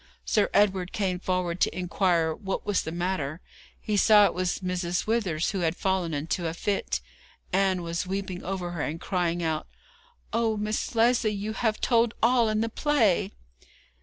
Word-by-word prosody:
Sir 210 - +2
Edward 190 -3 +2
came 185 -3 -1
forward 180 -1 -1
to - - +1
inquire 175 -3 +1
what 195 +2 -4
was 205 -2 +1
the 160 - -5
matter. 170 -3 -2 0.4
He 210 - -2
saw 210 0 +6
it - - +1
was 185 -1 -1
Mrs. 180 -1 -2
Withers 195 -8 0
who 195 - -2
had 165 -1 0
fallen 190 -3 0
into 160 +4 -2
a 165 - -3
fit. 120 - -1 0.5
Ann 190 -2 +2
was 170 +2 -3
weeping 190 -1 -4
over 180 -1 -3
her, 170 -3 -4
and 160 +3 -3
crying 175 -2 -1
out: 160 -1 -1 0.7
'Oh, 225 -1 +1
Miss 210 +3 -2
Lesley, 230 0 +3
you 205 +2 -3
have 220 -1 0
told 235 -2 +2
all 235 -1 +4
in 215 0 0
the 230 - 0
play!' 230 - +2
185 Hz, 170 wpm, -27 LUFS, 175-215 Hz, 0.7 s, saw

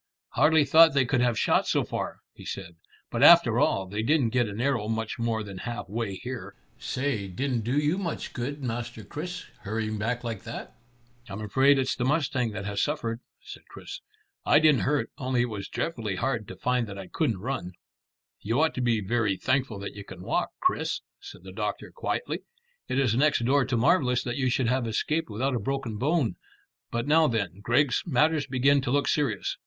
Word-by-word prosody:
"Hardly 150 +4 +4
thought 160 +1 +7
they 135 -2 +4
could 125 0 +1
have 120 -2 +2
shot - - +2
so - - +2
far," - - -4
he - - -13
said; 85 -3 -6 0.4
"but - - -2
after - - +7
all, 95 - +2
they 105 +3 -3
didn't 130 -1 +2
get 120 -1 +2
an 100 +2 -6
arrow 120 -4 0
much 110 +1 -3
more 115 -1 -1
than 100 -2 -8
half 120 +1 -5
way 105 -1 -3
here. 125 +4 -7 0.2
Say, 125 -7 -2
didn't 120 +6 -2
do 120 +6 -1
you 150 +5 +1
much 175 -5 -4
good, 140 +4 -4
Master 120 -2 -4
Chris, 175 - -6
hurrying 110 +1 -3
back 120 +3 -2
like 115 -4 -4
that." - - -8 0.6
"I'm 100 +2 -6
afraid 135 +7 +4
it's 130 0 0
the 125 - -2
mustang 130 -3 +1
that 100 - -5
has 100 -1 -1
suffered," 120 -6 -1 0.2
said - - -11
Chris. - - -9 0.4
"I - - +5
didn't 155 -3 +5
hurt, 135 -5 0
only 130 -2 0
it 120 - -2
was 100 -2 -5
dreadfully 115 - -3
hard 115 -1 -2
to 95 - -8
find 125 +3 0
that 100 -1 -8
I 95 - -6
couldn't 115 - -1
run." 100 -4 -4 0.7
"You 115 +6 0
ought 160 +1 +3
to 125 - -3
be 115 -3 +2
very 105 -1 0
thankful 130 +1 0
that 100 - -6
you 100 - -8
can 95 -2 -11
walk, 175 - 0
Chris," 370 0 0 0.2
said 400 0 -12
the - - -10
doctor - - -4
quietly. 475 0 -2 0.5
"It 130 - -1
is 130 -5 +2
next 140 -1 +2
door 135 +1 +3
to 120 - -1
marvellous 125 -1 +3
that 120 -1 -3
you 130 -2 +1
should 125 0 +1
have 125 0 +1
escaped 150 +8 -1
without 130 +6 -1
a 120 - 0
broken 125 -1 -3
bone. 145 -3 +1 0.5
But 120 0 -2
now 155 +2 +5
then, 100 - -2
Griggs, 125 +3 +2
matters 155 +1 +2
begin 135 +2 +3
to 130 - -3
look 140 +1 +2
serious. 135 -10 0
125 Hz, 200 wpm, -27 LUFS, 110-140 Hz, 0.7 s, thought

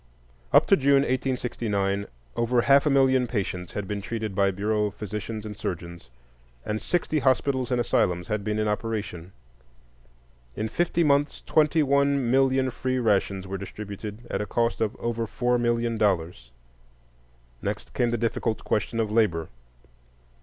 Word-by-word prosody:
Up - - +6
to - - +5
June, 140 0 +4
1869, 115 -7 -1 0.3
over 120 +1 +2
half 140 +2 +5
a - - +4
million 130 -2 +3
patients 95 -6 -3
had 100 -2 -4
been 105 0 -3
treated 110 -1 -4
by 100 0 +3
Bureau 105 +2 0
physicians 105 +1 -6
and 105 -1 -6
surgeons, 85 - -6 0.6
and 105 0 -2
sixty 165 -3 0
hospitals 130 0 +1
and 125 - +2
asylums 90 -6 +1
had 105 -1 -2
been 105 +1 -1
in 110 0 0
operation. 105 -5 -3 1.2
In 110 - -2
fifty 170 +5 +1
months 145 -1 +1
twenty 155 0 +3
one 140 -2 +2
million 130 0 +3
free 130 +1 -2
rations 100 -5 +1
were 95 +1 -5
distributed 105 +3 -7
at - - -2
a 105 - -4
cost 115 0 0
of 110 +2 0
over 115 -1 -2
four 125 +2 0
million 120 -1 0
dollars. 85 - 0 1.1
Next 105 +1 -4
came 120 -2 +1
the 120 - 0
difficult 115 0 -1
question 110 +2 -1
of 110 -2 0
labor. 100 -8 +1
110 Hz, 150 wpm, -26 LUFS, 100-130 Hz, 1.2 s, Up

